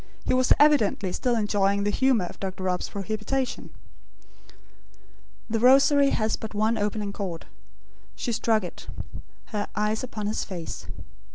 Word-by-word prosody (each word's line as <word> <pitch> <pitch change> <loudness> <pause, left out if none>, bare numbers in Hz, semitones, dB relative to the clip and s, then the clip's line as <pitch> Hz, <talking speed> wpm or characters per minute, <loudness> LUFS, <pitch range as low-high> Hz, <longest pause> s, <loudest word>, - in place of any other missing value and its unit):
He - - +1
was 255 0 +2
evidently 225 -10 +3
still 245 -2 0
enjoying 200 -2 +1
the 205 - +1
humour 255 -5 +2
of - - -10
Dr. 190 -1 -5
Rob's 180 -1 -1
prohibition. 215 +6 -3 1.8
The 225 0 -1
Rosary 275 +3 +6
has 220 -4 0
but 220 -1 -7
one 215 +2 +2
opening 205 -1 -2
chord. 180 -6 -5 0.7
She 240 - -3
struck 225 -2 +1
it; 180 - -8 0.7
her 205 -1 -1
eyes 210 +2 0
upon 220 -4 -5
his 210 +1 -1
face. 175 -4 -7
215 Hz, 135 wpm, -26 LUFS, 200-240 Hz, 1.8 s, Rosary